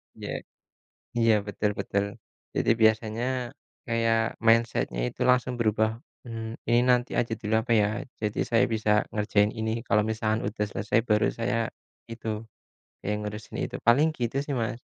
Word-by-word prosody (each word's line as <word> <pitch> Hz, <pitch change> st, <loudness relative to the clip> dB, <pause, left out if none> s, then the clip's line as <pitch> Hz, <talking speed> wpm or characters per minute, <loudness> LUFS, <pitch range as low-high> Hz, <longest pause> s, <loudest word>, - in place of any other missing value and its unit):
Iya -, -, -7 dB, 0.9 s
iya, 115 Hz, -1 st, +5 dB
betul 105 Hz, +1 st, -1 dB
betul. 100 Hz, +1 st, 0 dB, 0.5 s
Jadi -, -, +1 dB
biasanya 110 Hz, +1 st, +3 dB, 0.6 s
kayak 115 Hz, -1 st, +2 dB, 0.3 s
mindset-nya 115 Hz, -, +3 dB
itu -, -, -21 dB
langsung 125 Hz, 0 st, +2 dB
berubah, 110 Hz, -1 st, +2 dB, 0.3 s
mmm, 115 Hz, -1 st, -5 dB
Ini 120 Hz, +1 st, +5 dB
nanti 125 Hz, 0 st, +3 dB
aja 115 Hz, -1 st, -2 dB
dulu 105 Hz, +1 st, -1 dB
apa 115 Hz, -, -1 dB
ya? 105 Hz, -, +3 dB, 0.4 s
Jadi 105 Hz, 0 st, -1 dB
saya 115 Hz, -, +5 dB
bisa 110 Hz, -1 st, 0 dB, 0.2 s
ngerjain 105 Hz, 0 st, +2 dB
ini 110 Hz, 0 st, -1 dB, 0.2 s
kalau 105 Hz, +1 st, +3 dB
misalkan 110 Hz, 0 st, 0 dB
udah 105 Hz, 0 st, -2 dB
selesai, 105 Hz, +2 st, 0 dB
baru 105 Hz, 0 st, +3 dB
saya 115 Hz, +1 st, 0 dB, 0.6 s
itu 115 Hz, -1 st, -7 dB, 0.8 s
kayak 105 Hz, +1 st, 0 dB
ngurusin 105 Hz, +1 st, -6 dB
itu. -, -, -5 dB
Paling 140 Hz, +7 st, +6 dB
gitu 120 Hz, +2 st, -2 dB
sih, 140 Hz, -, -3 dB
Mas. 115 Hz, +1 st, -2 dB
110 Hz, 150 wpm, -27 LUFS, 105-115 Hz, 0.9 s, Paling